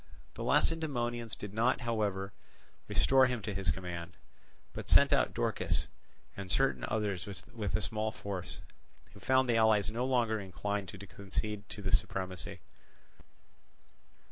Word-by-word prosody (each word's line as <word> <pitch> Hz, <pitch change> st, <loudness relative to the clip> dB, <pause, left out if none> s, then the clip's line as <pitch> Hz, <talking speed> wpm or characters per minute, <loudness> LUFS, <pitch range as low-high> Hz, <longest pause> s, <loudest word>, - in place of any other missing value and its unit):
The -, -, -8 dB
Lacedaemonians 120 Hz, -8 st, +1 dB
did 105 Hz, -1 st, -7 dB
not, 120 Hz, +4 st, +2 dB
however, 105 Hz, -5 st, -1 dB, 0.5 s
restore 130 Hz, -1 st, +5 dB
him 125 Hz, -2 st, -1 dB
to 105 Hz, 0 st, -3 dB
his 95 Hz, 0 st, -1 dB
command, 85 Hz, -2 st, -3 dB, 0.6 s
but -, -, -7 dB
sent -, -, +7 dB
out -, -, +3 dB
Dorkis -, -, 0 dB, 0.5 s
and 100 Hz, -2 st, -6 dB
certain 135 Hz, +7 st, +2 dB
others 105 Hz, -4 st, -1 dB, 0.3 s
with 105 Hz, -4 st, -2 dB
a -, -, 0 dB
small 110 Hz, +3 st, 0 dB
force; 100 Hz, -4 st, -5 dB, 0.6 s
who 100 Hz, -, -13 dB
found 130 Hz, +4 st, +3 dB
the 120 Hz, -2 st, +3 dB
allies 110 Hz, -2 st, +4 dB
no 120 Hz, +3 st, -1 dB
longer 120 Hz, -4 st, +2 dB
inclined 100 Hz, +1 st, -3 dB
to 100 Hz, -, -8 dB
concede 100 Hz, +2 st, -4 dB
to 105 Hz, -, -7 dB
them 95 Hz, -, -2 dB
the -, -, +8 dB
supremacy. 95 Hz, -3 st, -3 dB
105 Hz, 145 wpm, -32 LUFS, 95-120 Hz, 0.6 s, the